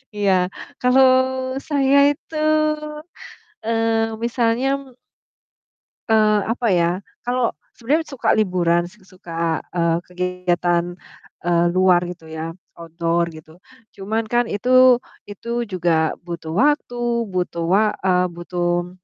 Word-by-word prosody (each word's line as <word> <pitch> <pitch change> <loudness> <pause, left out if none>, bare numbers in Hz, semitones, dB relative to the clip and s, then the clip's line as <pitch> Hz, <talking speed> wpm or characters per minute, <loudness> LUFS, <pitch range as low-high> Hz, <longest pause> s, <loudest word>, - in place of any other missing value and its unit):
Iya. 205 -2 +1 0.5
Kalau 255 +1 +5 0.6
saya 280 -2 +3
itu, 310 +2 -10 1.3
eee, 225 -1 0
misalnya 235 +2 +1
m 265 -3 -15 1.1
eee, 215 -2 +4
apa 230 +1 -1
ya, 170 -1 +3 0.3
kalau 245 -1 0 0.2
sebenernya 295 +7 0
suka 275 -4 0
liburan, 175 -4 +1
s 185 - -17
suka, 170 -3 -3 0.2
eee, 170 -1 +1
kegiatan, 175 -1 -1 0.5
eee, 170 0 +2
luar 185 -1 +5
gitu 165 -3 -10
ya, 160 +1 -5 0.2
outdoor 170 +1 -1
gitu. 155 +2 -15 0.3
Cuman 215 +3 -3
kan 240 0 +2
itu 250 +3 +4 0.2
itu 235 +3 -4
juga 170 -4 0
butuh 170 -2 -6
waktu, 240 -3 +1
butuh 180 -3 -3
wa 195 +5 +4 0.2
eee, 180 -1 +3
butuh 175 +1 -2
185 Hz, 110 wpm, -21 LUFS, 175-235 Hz, 1.3 s, Kalau